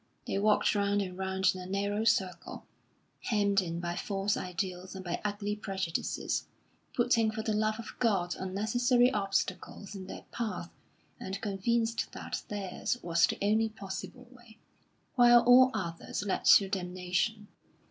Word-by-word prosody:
They 195 - -1
walked 210 +1 +3
round 205 0 +1
and 180 -1 -7
round 190 0 +1
in 185 - -7
a 180 - -8
narrow 200 +3 -1
circle, 190 -6 0 0.6
hemmed 200 -3 +2
in 170 -2 -4
by 175 0 -3
false 200 -1 -1
ideals 185 +1 -4
and 190 0 -7
by 175 - -3
ugly 205 0 -2
prejudices, 190 -5 -2 0.5
putting 235 -2 +3
for 220 0 -4
the 220 - 0
love 215 +1 +1
of 230 -2 -8
God 195 -7 +1
unnecessary 240 +6 +2
obstacles 200 0 -2
in 190 -2 -8
their - - -9
path 210 -7 -4 0.5
and 190 +1 -5
convinced 225 +3 -1
that - - -5
theirs 205 +3 -3
was 165 -2 +3
the - - -3
only 220 +2 +2
possible 220 +4 -8
way, 240 -3 -17 0.6
while 240 -1 +7
all 255 +1 +7
others 170 -2 -4
led 200 - -2
to 200 - +7
damnation. 185 +3 -2
200 Hz, 145 wpm, -30 LUFS, 185-220 Hz, 0.6 s, while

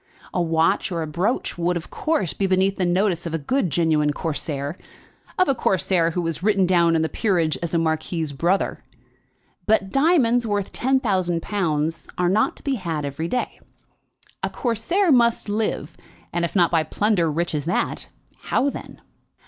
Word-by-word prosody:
A 180 - +1
watch 165 +4 +1
or 170 -2 -1
a - - -3
brooch 175 - -2
would, 175 +1 +1
of 165 - -9
course, 300 - -1
be 195 - 0
beneath 190 +1 +2
the 185 - +1
notice 175 -1 +1
of 165 - -3
a - - +1
good 185 - 0
genuine 155 -1 +2
Corsair, 145 -1 -3 0.6
of 370 - +4
a 275 - +3
Corsair 185 -7 +1
who 175 +1 -2
was 165 0 -3
written 200 -1 +3
down 170 -2 +3
in 160 - +2
the - - +1
peerage 170 -6 0
as 170 0 -2
a - - +4
marquis's 160 -1 -1
brother; 175 +7 0 0.8
but 205 -3 +2
diamonds 270 -5 +3
worth 205 -3 -2
ten 265 +2 +1
thousand 185 -8 0
pounds 165 -5 -1
are 180 -1 +2
not 210 +4 +2
to - - -15
be 275 -2 0
had 160 -4 -2
every 140 +4 -3
day. 250 +6 -3 0.8
A - - -1
Corsair 275 - 0
must 235 -4 +3
live, 205 -7 -2 0.4
and 170 0 0
if 170 - -6
not 175 -3 +4
by 165 -2 +3
plunder 175 +1 +1
rich 170 +3 -1
as 150 -1 -2
that, 175 - -1 0.4
how 280 +3 +1
then? - - -10
175 Hz, 180 wpm, -23 LUFS, 165-210 Hz, 0.8 s, of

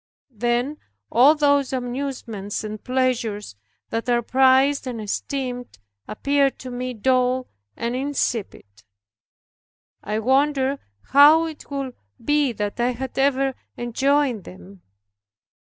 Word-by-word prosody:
Then 240 +6 -1 0.3
all 265 +7 +6
those 285 -2 +2
amusements 245 -6 -4
and 215 0 -6
pleasures 245 - -1 0.4
that 230 +2 -2
are 240 -1 +2
prized 265 +3 +3
and 240 -3 -4
esteemed 245 - -4 0.3
appeared 280 +3 +1
to 255 - -8
me 250 0 -4
dull 255 +2 +1 0.3
and 235 +1 -2
insipid. 260 -5 -2 1.4
I 210 +1 -2
wondered 270 +3 +2 0.3
how 300 +4 +7
it 315 -2 -8
could 275 -3 -4 0.3
be 295 -3 +2
that 210 0 -4
I 245 +1 +1
had 265 +2 -5
ever 270 0 +2 0.2
enjoyed 260 -1 +1
them. 190 +1 -13
255 Hz, 110 wpm, -23 LUFS, 235-275 Hz, 1.4 s, how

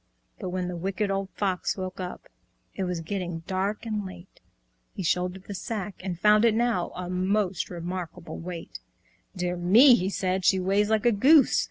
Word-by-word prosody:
But - - -4
when 180 0 -2
the 180 - -4
Wicked 195 +3 -2
Old 195 0 -2
Fox 190 -2 -1
woke 185 0 -5
up, 180 -1 -6 0.5
It 190 - -3
was 180 -2 -3
getting 175 -1 -4
dark 195 +4 -2
and 215 -2 -2
late. 185 -1 -11 0.6
He 190 - -4
shouldered 180 +2 -1
the 200 - -7
sack, 210 0 -4
and 180 -3 -4
found 210 +2 +5
it 230 -2 +4
now 230 -6 +1
A 180 -1 -5
most 185 +1 0
remarkable 175 0 -6
weight. 170 - -7 0.6
"Dear 180 -1 -2
me!" 220 +10 +7
he 190 -5 +2
said, 190 -1 -1
"she 190 +2 +4
weighs 200 +3 +1
like 220 0 +1
a 240 - +6
goose! 275 +8 +5
185 Hz, 180 wpm, -26 LUFS, 180-205 Hz, 0.6 s, me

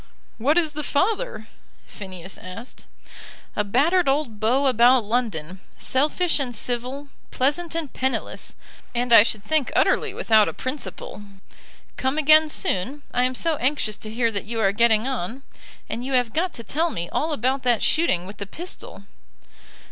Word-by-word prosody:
"What 285 +8 +2
is 325 -3 +3
the 300 0 -4
father?" 420 - -1 0.4
Phineas 190 -2 -9
asked. 205 +7 -10 0.7
"A 210 - +1
battered 290 - +2
old 270 -6 -1
beau 250 +6 +2
about 245 -1 +5
London, 200 -7 -2 0.2
selfish 305 +6 +1
and 250 -4 -3
civil, 250 +5 -3 0.2
pleasant 300 +6 0
and 320 -5 -3
penniless, 260 0 -3 0.4
and 240 0 +1
I 230 - +11
should 215 -1 -1
think 310 +1 0
utterly - - +2
without 220 -2 +4
a - - -7
principle. 255 -5 -6 0.8
Come 265 +3 -1
again 310 +1 +6
soon. 270 +3 -2
I 250 0 +2
am 255 0 -1
so 325 +3 +2
anxious 255 -5 0
to 215 - -8
hear 230 +1 0
that 200 -2 -3
you 225 +1 -4
are 195 -3 +3
getting 225 +2 +3
on. 255 0 -4 0.4
And 230 +2 -4
you 265 +1 -4
have 245 -3 +2
got 350 +3 0
to 230 - -8
tell 325 +8 0
me 170 - -4
all 315 +2 -1
about 270 -2 0
that 245 -3 +1
shooting 185 - +2
with 200 +2 -10
the 200 - -6
pistol." 315 - -8
255 Hz, 165 wpm, -23 LUFS, 220-295 Hz, 0.8 s, I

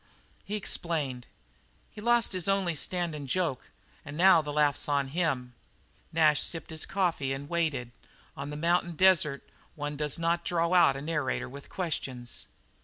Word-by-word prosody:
He 210 - -4
explained: 150 -10 -2 0.6
"He's 210 - -10
lost 235 -2 +3
his 185 -1 -2
only 195 -3 +2
standin' 160 -2 -2
joke, 155 -2 -1 0.3
and 145 +1 -8
now 180 -1 +7
the 150 -1 -5
laugh's 150 0 +1
on 140 -2 +1
pa!" 160 -5 +1 0.7
Nash 155 -2 +4
sipped 165 0 -2
his 160 0 -3
coffee 170 -8 0
and 140 +1 -6
waited. 150 -8 -1 0.4
On 140 +1 -5
the 150 - -5
mountain 170 +2 +1
desert 165 -5 +3 0.3
one 145 -1 -4
does 150 0 -1
not 170 +1 0
draw 170 0 0
out 170 -6 +5
a 135 - -6
narrator 145 -5 -1
with 140 +2 -11
questions. 135 -9 -4
160 Hz, 155 wpm, -29 LUFS, 140-175 Hz, 0.7 s, now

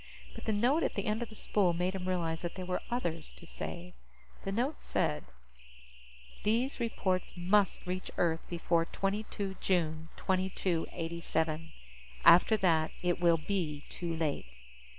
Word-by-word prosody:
But - - -9
the 220 - +1
note 245 +10 +3
at - - 0
the 200 - -1
end 215 +2 0
of 240 - -3
the 215 - -11
spool 195 -4 +2
made 180 +2 0
him 185 -1 -4
realize 165 -3 0
that 175 - -4
there 185 - -5
were 180 0 -1
others 170 -10 -2
to 170 - -14
save. 175 +1 -6 0.5
The 195 - -2
note 250 +9 -1
said: - - 0 1.2
_These 235 +6 +1
reports 190 -6 0
must 190 +3 +2
reach 185 +1 -3
Earth 165 -2 +2
before 170 -1 +1
22 195 0 -2
June 165 -3 0
2287. 165 -3 -1 0.5
After 200 +5 +8
that, 165 -5 +3
it 175 -1 +1
will 170 -1 +5
be 155 -4 -2
too 170 -2 -3
late. 145 - -2
180 Hz, 150 wpm, -32 LUFS, 165-200 Hz, 1.2 s, After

